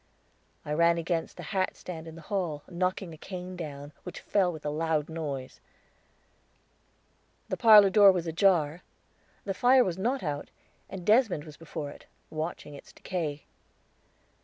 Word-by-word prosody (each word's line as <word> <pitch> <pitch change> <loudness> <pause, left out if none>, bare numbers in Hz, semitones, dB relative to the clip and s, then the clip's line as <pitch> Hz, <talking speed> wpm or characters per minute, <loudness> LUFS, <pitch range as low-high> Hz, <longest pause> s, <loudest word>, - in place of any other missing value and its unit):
I 150 - -2
ran 170 +2 +4
against 170 0 -2
the 175 - -7
hatstand 175 -1 -3
in 160 - -9
the 165 - -11
hall, 175 -7 -2
knocking 185 0 -2
a - - -11
cane 185 -1 -7
down, 145 -4 -7
which 180 - -8
fell 190 -3 +1
with 155 -3 -10
a 150 - 0
loud 155 0 0
noise. 145 -5 -5 1.9
The - - -1
parlor 210 -4 +8
door 205 -1 +8
was 180 -3 -2
ajar; 165 -2 +2 0.6
the 195 - -1
fire 250 +6 +5
was 185 -3 -3
not 250 +5 0
out, 145 -3 -3 0.4
and 185 -2 -7
Desmond 215 - +3
was 155 -1 -11
before 150 -2 -6
it, - - -15 0.2
watching 155 -1 -5
its 140 - -12
decay. 155 -6 -4
170 Hz, 150 wpm, -29 LUFS, 155-190 Hz, 1.9 s, parlor